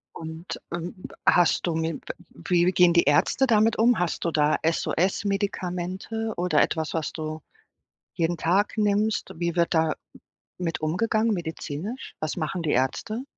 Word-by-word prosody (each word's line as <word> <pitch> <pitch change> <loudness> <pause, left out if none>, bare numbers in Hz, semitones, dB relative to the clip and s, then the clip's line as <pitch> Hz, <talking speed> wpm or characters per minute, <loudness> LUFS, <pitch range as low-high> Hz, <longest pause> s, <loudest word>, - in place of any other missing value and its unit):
Und, 160 +2 -7
ähm, 175 +3 -4 0.3
hast 175 0 +4
du 170 - 0
mit 160 0 -2 0.3
wie 175 -1 +1
gehen 180 -1 +5
die 170 - +4
Ärzte 145 - +3
damit 225 -2 +3
um? 235 0 +4
Hast 175 -1 -1
du 170 - +1
da 150 -1 +3
SOS-Medikamente 190 +4 -1
oder 175 -4 +2
etwas, 160 -1 -1
was 160 -3 -2
du 155 0 -5 0.7
jeden 170 +1 0
Tag 185 +6 +1
nimmst? 210 0 +1
Wie 170 0 -2
wird 170 0 +2
da 160 -1 +2 0.6
mit 170 -3 -2
umgegangen 215 +7 +1
medizinisch? 170 - -5
Was 155 +2 -2
machen 170 +2 -2
die 155 - -1
Ärzte? 215 - -1
175 Hz, 145 wpm, -25 LUFS, 160-205 Hz, 0.7 s, gehen